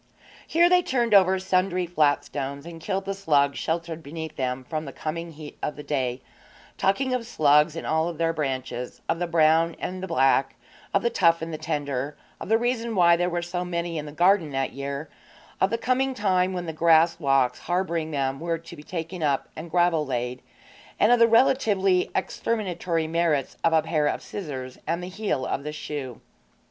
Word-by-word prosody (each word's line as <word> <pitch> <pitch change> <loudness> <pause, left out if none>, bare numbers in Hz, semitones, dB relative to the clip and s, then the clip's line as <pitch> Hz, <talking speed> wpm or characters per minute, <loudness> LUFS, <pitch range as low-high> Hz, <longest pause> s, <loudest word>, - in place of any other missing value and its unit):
Here 340 +2 +4
they 360 0 +5
turned 240 -8 0
over 190 -1 +6
sundry 185 -1 0
flat 155 -4 +2
stones 140 +1 -5
and 165 -1 -9
killed 195 +1 -2
the 195 - -2
slugs 145 -8 +1
sheltered 165 0 -3
beneath 160 +1 -7
them 130 0 -2
from 155 +4 -4
the 135 - -6
coming 165 +3 -5
heat 150 -1 -11
of 150 - -2
the 150 - -8
day, 130 -4 -2 0.5
talking 255 +7 +1
of 240 -2 -2
slugs 150 -6 +4
in 165 - -5
all 160 +2 +1
their 165 0 0
branches 130 -5 -4
of 165 - 0
the 175 - -1
brown 165 0 +3
and 185 0 -5
the 190 - -4
black, 135 -3 +2 0.4
of 200 - +1
the 235 - +1
tough 165 -3 +3
and 165 0 -5
the - - -3
tender, 145 -3 -3 0.2
of - - -7
the 225 - +5
reason 235 -1 -1
why 170 -2 +6
there 175 +1 0
were 175 0 -2
so 175 +1 -3
many 170 -2 -3
in 150 - -6
the - - -7
garden 175 +1 +3
that 135 -1 -2
year, 140 +3 -5 0.5
of 190 - +4
the 230 - 0
coming 260 +2 0
time 185 -4 +1
when 180 -1 -4
the 160 - -4
grass 165 +1 +4
walks 135 -4 +2
harbouring 170 -2 -1
them 135 -2 -1
were 165 +1 -1
to 165 +1 -12
be 150 - -11
taken 170 +2 -6
up 140 -3 0
and 160 +2 -7
gravel 175 -2 +2
laid, 125 -2 -3 0.6
and 215 - +5
of 245 - +5
the 230 - +7
relatively 210 -6 +3
exterminatory 180 -7 -1
merits 160 -4 0
of 165 - +4
a 160 -1 +3
pair 155 -2 +1
of - - -2
scissors 130 -9 -6
and 170 +1 -1
the - - -5
heel 185 -9 -2
of 140 - -2
the 150 - -4
shoe. 145 -5 -6
165 Hz, 200 wpm, -25 LUFS, 150-185 Hz, 0.6 s, the